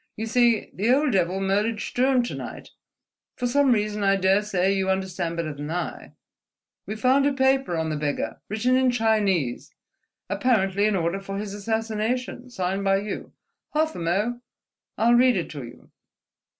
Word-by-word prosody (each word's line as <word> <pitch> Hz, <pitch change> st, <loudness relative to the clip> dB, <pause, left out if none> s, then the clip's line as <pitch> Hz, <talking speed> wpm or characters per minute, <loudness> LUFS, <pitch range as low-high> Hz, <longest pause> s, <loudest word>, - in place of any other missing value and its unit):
You 220 Hz, -, -4 dB
see, 235 Hz, -1 st, +2 dB
the 215 Hz, +6 st, +1 dB
old 285 Hz, +1 st, +3 dB
devil 185 Hz, -2 st, +1 dB
murdered 205 Hz, +3 st, 0 dB
Sturm 255 Hz, +2 st, +1 dB
to 240 Hz, -, -4 dB
night, -, -, -8 dB, 0.7 s
for 250 Hz, -, -3 dB
some 275 Hz, +2 st, +3 dB
reason 210 Hz, -2 st, 0 dB
I 195 Hz, 0 st, +4 dB
daresay 195 Hz, 0 st, +2 dB
you 190 Hz, -1 st, 0 dB
understand 185 Hz, -3 st, -2 dB
better 160 Hz, -2 st, -2 dB
than 145 Hz, +1 st, -7 dB
I: 175 Hz, +2 st, -4 dB, 0.7 s
we 215 Hz, -, -4 dB
found 260 Hz, +5 st, +3 dB
a 285 Hz, -, +1 dB
paper 265 Hz, -8 st, +2 dB
on 160 Hz, -1 st, -1 dB
the -, -, -1 dB
beggar, 145 Hz, -1 st, -3 dB
written 230 Hz, +5 st, +1 dB
in 260 Hz, 0 st, +3 dB
Chinese, 210 Hz, -, 0 dB, 0.6 s
apparently 200 Hz, -1 st, +1 dB
an 215 Hz, -, +1 dB
order 170 Hz, +1 st, -1 dB
for 195 Hz, 0 st, -5 dB
his 205 Hz, -1 st, -5 dB
assassination 225 Hz, +4 st, -2 dB
signed 190 Hz, -3 st, -2 dB
by 195 Hz, 0 st, +3 dB
you. 210 Hz, -, -6 dB, 0.4 s
Half 315 Hz, +1 st, +1 dB
a -, -, -6 dB
mo': 205 Hz, +9 st, -1 dB, 0.6 s
I'll 235 Hz, +2 st, +4 dB
read 245 Hz, -2 st, +5 dB
it 175 Hz, -, -3 dB
to 145 Hz, -, -6 dB
you 120 Hz, +1 st, -13 dB
210 Hz, 165 wpm, -25 LUFS, 190-245 Hz, 0.7 s, read